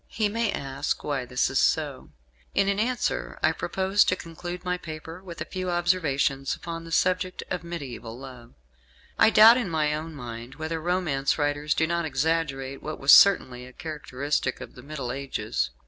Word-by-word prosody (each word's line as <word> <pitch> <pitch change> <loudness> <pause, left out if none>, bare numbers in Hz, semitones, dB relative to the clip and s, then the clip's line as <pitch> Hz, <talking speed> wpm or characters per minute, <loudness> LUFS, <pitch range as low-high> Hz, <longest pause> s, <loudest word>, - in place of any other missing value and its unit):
He 215 -2 -1
may 225 0 0
ask 135 -1 -3
why 140 -4 -2
this 125 +1 +1
was 130 +1 0
so; 145 -4 0 0.5
and 195 0 +3
in 200 0 +1
answer 245 +3 -1
I - - +5
propose 190 +2 +1
to 185 - +2
conclude 175 +1 -7
my 180 0 0
paper 160 +1 -8
with 170 -4 -9
a - - -2
few 185 0 -4
observations 160 -6 +1
upon 165 -1 -7
the 165 - -10
subject 185 +2 +1
of 180 -3 -2
mediaeval 130 -9 -7
love. 125 - -12 0.6
I - - +7
doubt 225 +2 +8
in 240 -7 -1
my 155 -2 +1
own 155 +1 -5
mind 120 -1 -8
whether 160 +1 -4
romance 160 -6 0
writers 145 0 0
do 160 - +2
not 170 +1 -1
exaggerate 140 -2 -1
what 155 0 -6
was 135 +1 +5
certainly 125 -11 +6
a 130 - -14
characteristic 145 -3 -3
of - - -9
the 125 - -12
Middle 140 -3 -5
Ages. 125 - -2
155 Hz, 180 wpm, -26 LUFS, 135-180 Hz, 0.6 s, doubt